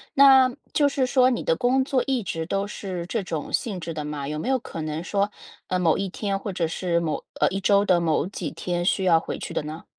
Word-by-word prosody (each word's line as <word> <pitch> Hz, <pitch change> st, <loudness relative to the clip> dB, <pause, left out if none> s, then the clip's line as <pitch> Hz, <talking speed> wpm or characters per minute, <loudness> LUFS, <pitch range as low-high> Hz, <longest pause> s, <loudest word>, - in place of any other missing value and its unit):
那， 265 Hz, -2 st, +7 dB, 0.2 s
就 290 Hz, -1 st, +4 dB
是 270 Hz, -1 st, 0 dB
说 255 Hz, -1 st, +4 dB
你 245 Hz, -, -1 dB
的 165 Hz, -, +2 dB
工 255 Hz, +7 st, +2 dB
作 265 Hz, -2 st, +1 dB
一 260 Hz, -5 st, 0 dB
直 165 Hz, -2 st, -3 dB
都 195 Hz, +3 st, -1 dB
是 185 Hz, -4 st, -5 dB
这 220 Hz, -2 st, -2 dB
种 160 Hz, -4 st, -4 dB
性 200 Hz, -6 st, -1 dB
质 165 Hz, -1 st, -5 dB
的 150 Hz, -1 st, -4 dB
吗？ 145 Hz, -2 st, -4 dB
有 150 Hz, +1 st, -3 dB
没 240 Hz, -, -3 dB
有 260 Hz, -1 st, +2 dB
可 165 Hz, -7 st, -7 dB
能 155 Hz, +1 st, -3 dB
说， 200 Hz, +2 st, 0 dB, 0.4 s
呃， 185 Hz, 0 st, 0 dB
某 165 Hz, -3 st, +3 dB
一 195 Hz, -1 st, -2 dB
天 195 Hz, 0 st, -2 dB
或 200 Hz, 0 st, -5 dB
者 170 Hz, -3 st, -1 dB
是 170 Hz, 0 st, 0 dB
某 160 Hz, -3 st, -2 dB, 0.2 s
呃， -, -, +4 dB
一 195 Hz, +1 st, -3 dB
周 200 Hz, +1 st, +4 dB
的 175 Hz, -3 st, +3 dB
某 160 Hz, -1 st, +1 dB
几 180 Hz, -5 st, -5 dB
天 175 Hz, -1 st, -3 dB
需 190 Hz, +1 st, +1 dB
要 170 Hz, -3 st, +6 dB
回 -, -, -6 dB
去 -, -, -6 dB
的 -, -, -1 dB
呢？ 155 Hz, +2 st, -7 dB
185 Hz, 270 characters per minute, -24 LUFS, 165-225 Hz, 0.4 s, 那